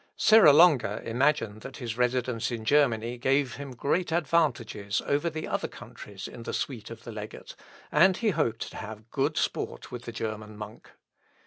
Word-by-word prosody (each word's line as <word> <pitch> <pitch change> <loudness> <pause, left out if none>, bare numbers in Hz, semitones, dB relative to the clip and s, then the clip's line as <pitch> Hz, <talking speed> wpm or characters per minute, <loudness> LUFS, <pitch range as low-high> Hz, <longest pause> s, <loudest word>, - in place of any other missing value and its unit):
Serra 215 -8 +7
Longa 150 -3 +5
imagined 115 -3 +1
that 135 +2 -9
his 115 -4 -4
residence 125 -1 0
in 115 -3 -5
Germany 120 -4 +2
gave 135 0 +1
him 140 -2 -8
great 170 +8 0
advantages 135 - 0
over 145 +4 +1
the 155 0 -5
other - - -2
courtiers 100 -2 -10
in 120 - -10
the - - -5
suite 120 -6 -4
of 115 - -10
the 120 - -8
legate, 105 -1 -8 0.4
and 180 +5 +5
he 225 -3 +1
hoped 120 - -1
to - - -9
have 110 +1 -9
good - - 0
sport - - -2
with 120 -1 -7
the 120 - -5
German 110 -1 -5
monk. 105 0 -10
125 Hz, 175 wpm, -28 LUFS, 110-145 Hz, 0.4 s, Serra